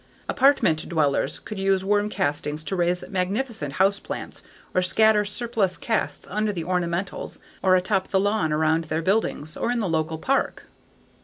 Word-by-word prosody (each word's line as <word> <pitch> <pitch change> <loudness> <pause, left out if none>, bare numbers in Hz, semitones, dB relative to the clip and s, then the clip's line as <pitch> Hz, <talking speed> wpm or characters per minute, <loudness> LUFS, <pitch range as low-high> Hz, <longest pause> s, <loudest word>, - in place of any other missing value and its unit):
Apartment 260 - +3
dwellers 150 -4 +1
could 215 - -8
use 195 -1 +1
worm 205 +1 +2
castings 150 -3 -2
to 190 - -3
raise 175 0 0
magnificent 190 - -2
house 200 +5 +3
plants - - -6 0.3
or 185 - +3
scatter 215 +3 +4
surplus 210 -2 -1
casts 225 -2 -2
under 215 +2 -1
the 175 -5 -4
ornamentals 180 +1 -2 0.2
or 185 -1 +4
atop 190 +1 +1
the 190 - +1
lawn 205 -5 +1
around 160 +1 +2
their 160 +1 -2
buildings 180 -5 0
or - - -2
in 245 - +1
the 215 -4 0
local 160 -1 -1
park. 270 +11 0
190 Hz, 160 wpm, -24 LUFS, 160-210 Hz, 0.3 s, scatter